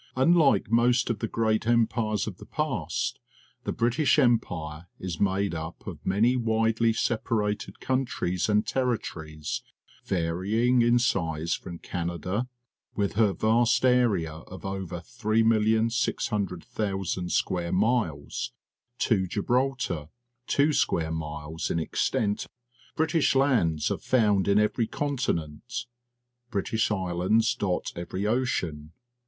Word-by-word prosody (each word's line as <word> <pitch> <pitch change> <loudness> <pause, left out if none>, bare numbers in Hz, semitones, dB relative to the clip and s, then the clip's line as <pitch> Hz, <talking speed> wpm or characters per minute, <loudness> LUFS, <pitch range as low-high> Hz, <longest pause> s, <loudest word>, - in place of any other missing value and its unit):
Unlike 135 - +4
most 120 +1 +3
of 110 - -3
the 115 - -1
great 110 0 0
em 115 -1 +5
pires 110 -2 -1
of - - -6
the - - -12
past, - - -2 0.5
the - - -1
British 130 +4 +2
Empire 90 - +1
is 90 -3 -5
made 100 -1 +1
up 80 +1 -6
of - - -8
many 110 +6 +3
widely 115 -1 +2
separated 110 -3 -1
countries 120 -9 -1
and 105 0 +3
territories, 80 - -2 0.4
varying 100 +8 +1
in 120 +1 +4
size 85 -8 0
from 85 -2 -6
Canada, 90 +7 -3 0.5
with 100 -1 0
her 105 -1 +3
vast 115 +5 +2
area 115 -11 +3
of 90 +5 -11
over 95 -3 -4
3,600,000 110 -4 0
square 85 -1 0
miles, 95 - 0 0.5
to 95 -8 +1
Gibraltar, 115 - -1 0.4
two 145 +2 +3
square 80 - +1
miles 75 0 -4
in - - 0
extent. 100 +5 0 0.5
British 160 -2 +2
lands 110 - +2
are - - -1
found 105 -6 +2
in 100 0 +4
every 105 +2 +2
continent. 120 - -3 0.6
British 110 +1 0
islands 100 +4 +1
dot 100 -7 -2
every 90 +3 -4
ocean. 90 -10 -1
105 Hz, 115 wpm, -27 LUFS, 90-120 Hz, 0.6 s, em